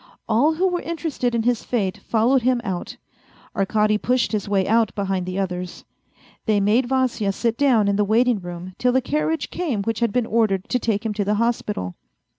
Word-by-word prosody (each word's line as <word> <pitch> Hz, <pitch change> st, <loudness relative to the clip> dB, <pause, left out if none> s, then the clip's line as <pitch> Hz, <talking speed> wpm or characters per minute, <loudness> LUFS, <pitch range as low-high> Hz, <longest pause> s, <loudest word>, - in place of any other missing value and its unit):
All 275 Hz, +9 st, +3 dB
who 370 Hz, +4 st, +2 dB
were 360 Hz, -1 st, -1 dB
interested 315 Hz, -7 st, -2 dB
in 230 Hz, -, 0 dB
his 240 Hz, -1 st, +1 dB
fate 195 Hz, -7 st, -1 dB
followed 240 Hz, +4 st, +2 dB
him 250 Hz, 0 st, +2 dB
out. 185 Hz, -3 st, -4 dB, 0.6 s
Arkady 210 Hz, +1 st, +2 dB
pushed 250 Hz, +1 st, +1 dB
his 210 Hz, -2 st, -2 dB
way 195 Hz, -2 st, +1 dB
out 225 Hz, -1 st, +3 dB
behind 195 Hz, -3 st, -2 dB
the 185 Hz, +1 st, -4 dB
others. 180 Hz, -2 st, -4 dB, 0.6 s
They 215 Hz, -2 st, +3 dB
made 220 Hz, +5 st, +2 dB
Vasya 255 Hz, -6 st, +1 dB
sit 230 Hz, +3 st, -1 dB
down 240 Hz, -6 st, +3 dB
in 200 Hz, 0 st, +1 dB
the 210 Hz, -, +3 dB
waiting 230 Hz, +2 st, +2 dB
room 175 Hz, 0 st, -8 dB
till 250 Hz, 0 st, +2 dB
the 260 Hz, -, +4 dB
carriage 305 Hz, +3 st, -1 dB
came 275 Hz, -, -2 dB
which 225 Hz, +1 st, -2 dB
had 235 Hz, -3 st, +1 dB
been 245 Hz, +1 st, +1 dB
ordered 215 Hz, -5 st, +1 dB
to 250 Hz, -, +1 dB
take 225 Hz, -2 st, -1 dB
him 220 Hz, -, -1 dB
to 205 Hz, 0 st, -1 dB
the 205 Hz, +1 st, 0 dB
hospital. 210 Hz, -, -1 dB
225 Hz, 200 wpm, -22 LUFS, 200-250 Hz, 0.6 s, the